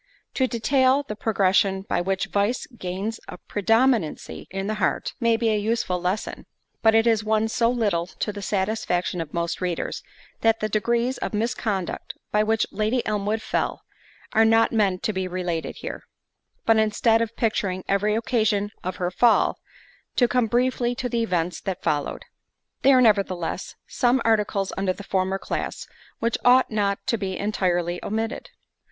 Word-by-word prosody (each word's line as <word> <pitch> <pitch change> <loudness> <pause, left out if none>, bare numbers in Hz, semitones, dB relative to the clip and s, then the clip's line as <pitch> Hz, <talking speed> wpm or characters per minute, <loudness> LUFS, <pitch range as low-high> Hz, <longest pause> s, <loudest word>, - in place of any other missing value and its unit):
To 260 - +1
detail 260 +3 +2
the 210 - -4
progression 195 -2 +2
by 195 - -1
which 190 +1 -1
vice 205 +5 0
gains 205 -1 -5
a - - -8
predominancy 225 - 0
in 195 +1 -4
the 215 - -1
heart, - - 0
may 230 -2 +3
be 230 -1 +1
a 215 -1 +2
useful 205 -4 -1
lesson; 185 +4 -3 0.3
but 220 0 +5
it 225 0 +4
is 225 -2 +3
one 220 0 +1
so 230 +1 +1
little 205 -9 0
to 210 +2 -4
the 205 - -7
satisfaction 190 -3 -1
of 155 -3 -6
most 170 +1 -2
readers, 180 -2 -2 0.4
that 225 0 +3
the 215 - -1
degrees 235 +4 0
of - - -3
misconduct 215 -4 -2 0.2
by 210 - +3
which 220 +1 +2
Lady 215 +4 0
Elmwood 210 +1 -1
fell, - - -2 0.5
are 220 - +5
not 225 0 +4
meant 200 -5 +1
to 215 - 0
be 190 -1 -2
related 175 -2 -3
here; - - -5 0.6
but 225 -1 +5
instead 220 +1 +3
of 230 0 -2
picturing 195 -5 -1
every 210 +2 +1
occasion 215 -3 +1
of 185 0 -3
her 180 -1 -2
fall, 235 +5 +3 0.6
to 245 - +4
come 245 -1 +1
briefly 245 +1 +1
to 250 0 -3
the 235 0 0
events 180 -5 -1
that 190 -2 -4
followed. 145 -1 -1 0.6
There 270 -1 +6
are, - - +5
nevertheless, 195 -6 +1
some 250 +1 +2
articles 210 -3 +1
under 190 -1 0
the 200 - -10
former 190 0 0
class, - - -4 0.3
which 230 0 -1
ought 250 0 +5
not 200 -2 0
to 230 -4 0
be 190 -2 -3
entirely 175 -4 -1
omitted. 225 +3 -3
215 Hz, 165 wpm, -24 LUFS, 190-230 Hz, 0.6 s, There